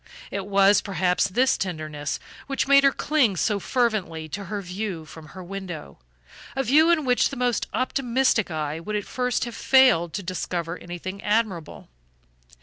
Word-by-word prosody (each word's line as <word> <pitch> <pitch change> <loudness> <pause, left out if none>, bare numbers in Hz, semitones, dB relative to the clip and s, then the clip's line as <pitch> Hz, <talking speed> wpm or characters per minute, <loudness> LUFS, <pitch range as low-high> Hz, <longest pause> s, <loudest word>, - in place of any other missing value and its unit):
It 200 -1 -4
was, 200 0 +5
perhaps, 185 -1 +1
this 250 +7 +2
tenderness 155 -5 -4 0.3
which 275 -1 -1
made 280 0 +6
her 275 - +6
cling 270 -9 +1
so 205 +3 +1
fervently 205 -11 -1
to 200 +5 -5
her 210 0 -4
view 185 -3 -5
from 155 0 -12
her 185 +4 -10
window, 175 - -7 0.6
a 270 - 0
view 305 +6 +5
in 325 -4 +3
which 250 -1 +3
the - - -7
most 245 -1 0
optimistic 255 -4 +1
eye 155 -1 -3
would 210 +5 -5
at 205 - -2
first 250 -2 -1
have 235 - -6
failed 250 -12 +4
to 200 - -4
discover 175 -2 -3
anything 175 +3 -7
admirable. 210 -7 -1
200 Hz, 160 wpm, -24 LUFS, 175-250 Hz, 0.6 s, made